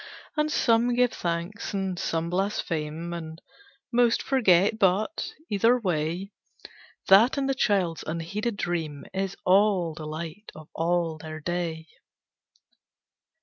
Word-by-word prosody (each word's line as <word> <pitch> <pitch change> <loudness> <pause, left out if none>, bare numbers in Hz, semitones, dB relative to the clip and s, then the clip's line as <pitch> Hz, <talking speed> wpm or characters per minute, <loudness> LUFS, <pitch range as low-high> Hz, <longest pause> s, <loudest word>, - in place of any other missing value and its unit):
And 300 0 +1
give - - -2 0.6
some - - -10
thanks, 175 +5 -3
and 190 -2 -2
some 165 +1 -2
blaspheme, 170 -4 -2
And 160 -1 -7 0.5
most 240 -1 +3
forget, 210 -5 +3
but, 205 - +1 0.2
either 230 +5 +3
way, 175 0 -2 0.8
That 215 +8 +6
and 275 -1 0
the 270 - +2
child's 195 -10 +1
unheeded 200 +8 -3
dream 160 -6 -3
Is 195 0 -2
all 190 -3 +3
the 155 -1 -7
light 165 +6 -7
of 155 -1 -12
all 165 -1 0
their 155 -1 -7
day. 165 -1 -3
175 Hz, 120 wpm, -26 LUFS, 165-205 Hz, 0.8 s, That